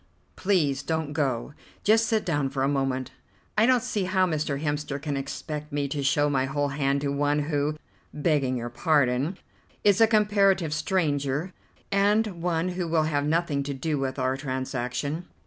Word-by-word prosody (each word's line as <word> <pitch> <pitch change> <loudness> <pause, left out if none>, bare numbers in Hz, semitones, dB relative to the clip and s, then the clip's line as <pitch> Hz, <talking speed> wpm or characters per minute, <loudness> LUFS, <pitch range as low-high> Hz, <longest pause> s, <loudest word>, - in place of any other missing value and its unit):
Please 155 -9 +1
don't 160 -2 -2
go; 135 -3 -1 0.3
just 225 +2 +4
sit 220 -1 +1
down 145 -5 0
for 135 0 -2
a - - +3
moment. 135 -2 -1 0.4
I 215 +2 +4
don't 255 -2 +4
see 205 -3 -1
how 185 0 +2
Mr. 155 -4 -1
Hemster 145 -1 -2
can 145 0 -3
expect 150 +2 -5
me 145 -1 -1
to 145 +1 -2
show 145 +1 +2
my 135 -2 +1
whole 145 +1 -1
hand 140 0 0
to 140 - -1
one 145 +1 +1
who, 150 0 -1 0.3
begging 145 -4 +1
your 120 0 -5
pardon, 140 +4 +1 0.5
is 205 +1 +4
a 225 - +8
comparative 200 -6 +3
stranger, 155 -1 0 0.4
and 205 +3 +3 0.2
one 170 0 0
who 180 -1 -3
will 160 -1 +2
have 145 -2 0
nothing 160 -3 +1
to 140 0 -4
do 150 +1 -1
with 135 0 -2
our 130 0 0
transaction. 130 +3 -3
145 Hz, 170 wpm, -26 LUFS, 140-175 Hz, 0.5 s, a